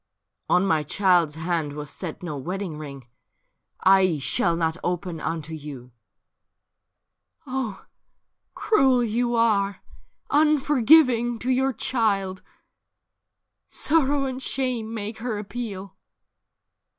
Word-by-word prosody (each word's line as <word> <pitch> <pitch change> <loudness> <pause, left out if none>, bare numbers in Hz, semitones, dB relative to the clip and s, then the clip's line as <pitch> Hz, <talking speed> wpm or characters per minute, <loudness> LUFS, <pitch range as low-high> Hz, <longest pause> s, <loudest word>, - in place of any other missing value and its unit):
' - - -54
On 180 - +3
my 160 -5 +2
child's 175 -1 +2
hand 160 -2 -2
was 150 -1 -7
set 180 0 -7
no 165 -4 -4
wedding 175 +3 -5
ring; 140 -4 -9 0.7
I 190 -3 +4
shall 165 +4 +1
not 160 -1 0
open 175 -1 -3
unto 160 0 -4
you.' 140 -5 -9 0.8
' - - -58 0.7
Oh, 255 -7 -4 0.7
cruel 265 - +3
you 240 +2 0
are! 205 -4 +1 0.5
Unforgiving 280 -4 +4
to 255 - 0
your 265 +1 +2
child: 200 -7 -1 1.3
Sorrow 290 -3 +1
and 260 0 -4
shame 250 -5 -2
make 220 0 -5
her 230 -2 -3
appeal.' 200 -3 -6
200 Hz, 110 wpm, -24 LUFS, 165-245 Hz, 1.3 s, I